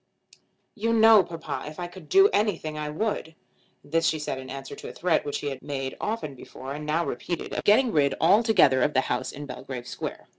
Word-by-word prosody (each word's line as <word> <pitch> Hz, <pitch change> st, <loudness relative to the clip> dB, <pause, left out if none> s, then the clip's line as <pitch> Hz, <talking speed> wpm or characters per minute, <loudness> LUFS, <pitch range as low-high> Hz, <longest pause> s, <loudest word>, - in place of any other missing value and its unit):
"You 230 Hz, +1 st, -1 dB
know, 225 Hz, -2 st, +7 dB
papa, 165 Hz, -3 st, -6 dB
if 155 Hz, -, -11 dB
I 175 Hz, -, -3 dB
could 175 Hz, -2 st, -12 dB
do 390 Hz, +1 st, +7 dB
anything 200 Hz, -, 0 dB
I 150 Hz, 0 st, -4 dB
would." 160 Hz, -1 st, -3 dB, 0.5 s
This 165 Hz, +2 st, +1 dB
she 160 Hz, -, +1 dB
said 150 Hz, -3 st, -4 dB
in 130 Hz, 0 st, -9 dB
answer 135 Hz, 0 st, -7 dB
to -, -, -8 dB
a -, -, -6 dB
threat, 175 Hz, -2 st, +1 dB
which 145 Hz, -, -3 dB
he 145 Hz, -, -2 dB
had 135 Hz, -2 st, -7 dB
made 135 Hz, -2 st, -4 dB
often 210 Hz, -10 st, -3 dB
before 130 Hz, +1 st, -9 dB
and 150 Hz, +1 st, -6 dB
now 165 Hz, +3 st, +1 dB
repeated, 175 Hz, -2 st, -4 dB
of -, -, -2 dB
getting 230 Hz, +4 st, +4 dB
rid 140 Hz, -5 st, +2 dB
altogether 195 Hz, -, +5 dB
of 150 Hz, +3 st, +1 dB
the 130 Hz, -, +5 dB
house 130 Hz, 0 st, -2 dB
in 145 Hz, +1 st, -8 dB
Belgrave 125 Hz, -3 st, -7 dB
Square. -, -, -6 dB
155 Hz, 215 wpm, -26 LUFS, 140-205 Hz, 0.5 s, know